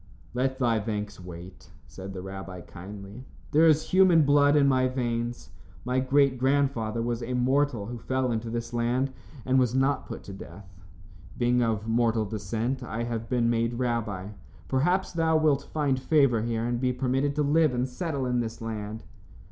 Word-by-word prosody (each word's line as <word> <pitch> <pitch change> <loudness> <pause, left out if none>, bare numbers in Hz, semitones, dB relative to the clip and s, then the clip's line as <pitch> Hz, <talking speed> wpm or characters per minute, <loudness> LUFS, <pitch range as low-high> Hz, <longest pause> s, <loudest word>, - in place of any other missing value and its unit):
"Let 130 +1 0
thy 120 -4 +2
thanks 105 -1 -4
wait," 90 +1 -11 0.2
said 95 +1 -9
the 90 -1 -6
rabbi, 95 -1 -7
kindly. 100 +6 -10 0.3
"There 160 +3 +5
is 155 0 +2
human 185 -4 +6
blood 145 0 +4
in 140 -2 +5
my 130 -1 +3
veins. 120 -2 -3 0.3
My 125 +1 +1
great 130 0 +3
grandfather 130 -5 +1
was 120 0 -2
a 125 +2 -3
mortal 130 -2 +1
who 120 +2 -6
fell 130 +2 -1
into 115 0 -2
this 115 +1 -4
land 120 +3 0 0.3
and 130 0 +3
was 125 -1 +1
not 135 +2 +1
put - - -7
to 100 - -9
death. 100 0 -11 0.7
Being 125 0 +2
of 110 -2 0
mortal 115 -1 +2
descent, 110 +5 -3
I 115 -1 -4
have 115 -1 -4
been 120 -2 +2
made 115 0 0
rabbi. 115 -6 -2 0.4
Perhaps 175 +9 +1
thou 160 -1 +2
wilt 150 -3 +1
find 140 -4 +1
favor 135 -5 +3
here 115 0 -1
and 120 0 -1
be 130 -1 +2
permitted 135 +3 0
to 150 - +1
live 155 +1 +3
and 125 +1 -1
settle 140 +1 -3
in 125 -1 0
this 115 -2 -4
land." 110 -1 -5
120 Hz, 175 wpm, -27 LUFS, 115-135 Hz, 0.7 s, human